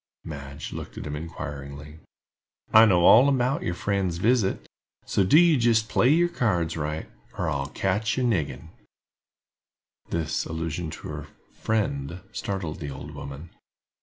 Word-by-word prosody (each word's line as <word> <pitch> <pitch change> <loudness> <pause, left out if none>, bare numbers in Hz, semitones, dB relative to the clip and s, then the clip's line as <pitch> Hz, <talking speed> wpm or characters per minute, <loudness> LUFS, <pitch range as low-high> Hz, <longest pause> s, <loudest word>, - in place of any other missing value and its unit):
Madge 70 -2 -7
looked - - -8
at - - -6
him 75 0 -4
inquiringly. 75 -1 -7 0.7
"I 110 +1 +9
know 90 -5 +4
all 125 +6 +8
about 130 0 +1
your 85 - -2
friend's 95 -2 -1
visit; 110 0 +1 0.4
so 100 - +1
do 95 +11 +5
you 170 -3 +6
jist 115 -2 +2
play 120 +4 +3
your 170 +4 +4
cards 95 - 0
right, 75 0 -3 0.3
or - - -1
I'll 70 -1 -2
catch 105 - -1
ye 130 - +1
niggin." 80 - -1 1.4
This 80 -3 -1
allusion 80 +1 -3
to 75 - -8
her - - -6 0.3
"friend" 90 -8 -2
startled 95 -6 -4
the 75 - -5
old 70 - -8
woman. 70 +4 -8
85 Hz, 145 wpm, -26 LUFS, 75-110 Hz, 1.4 s, I